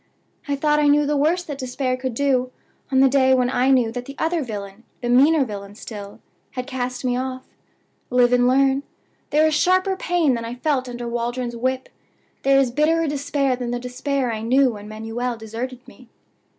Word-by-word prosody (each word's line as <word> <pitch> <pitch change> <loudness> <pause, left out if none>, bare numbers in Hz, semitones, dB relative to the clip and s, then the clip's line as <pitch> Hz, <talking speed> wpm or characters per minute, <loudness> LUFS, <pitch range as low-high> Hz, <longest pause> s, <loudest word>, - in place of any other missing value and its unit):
I 285 - 0
thought 300 +1 +2
I 295 - +3
knew 295 +1 +4
the 295 +1 0
worst 325 +5 +1
that 285 -3 -6
despair 255 0 -2
could 255 -2 -4
do 255 -2 +1 0.4
on 265 0 +4
the 270 - +7
day 260 -1 +4
when 250 -1 +1
I 255 0 +2
knew 250 -4 +3
that 245 +1 -5
the 275 - -9
other 325 0 0
villain, 205 -3 -7 0.2
the 240 - -3
meaner 280 +4 +5
villain 200 -2 -8
still, 205 -2 -9 0.3
had 250 -1 -4
cast 255 -1 -4
me 245 -1 +1
off. 255 0 -4 0.6
Live 245 -1 +4
and 245 0 +4
learn. 270 +1 +3 0.5
There 305 +2 +4
is 315 - +2
sharper 370 +5 +2
pain 350 -6 +1
than 230 -1 -3
I 230 +1 -5
felt 260 -1 -1
under 240 0 -5
Waldron's 240 +1 -3
whip; 260 +2 -2 0.5
there 275 0 +4
is 265 -3 +2
bitterer 315 +5 +2
despair 285 -2 0
than 245 -1 -4
the 245 0 -2
despair 250 0 -2
I 215 - -4
knew 255 +3 +3
when 210 -1 -9
Manuel 225 +3 -4
deserted 235 +3 -6
me. 255 -3 -16
255 Hz, 195 wpm, -22 LUFS, 240-280 Hz, 0.6 s, the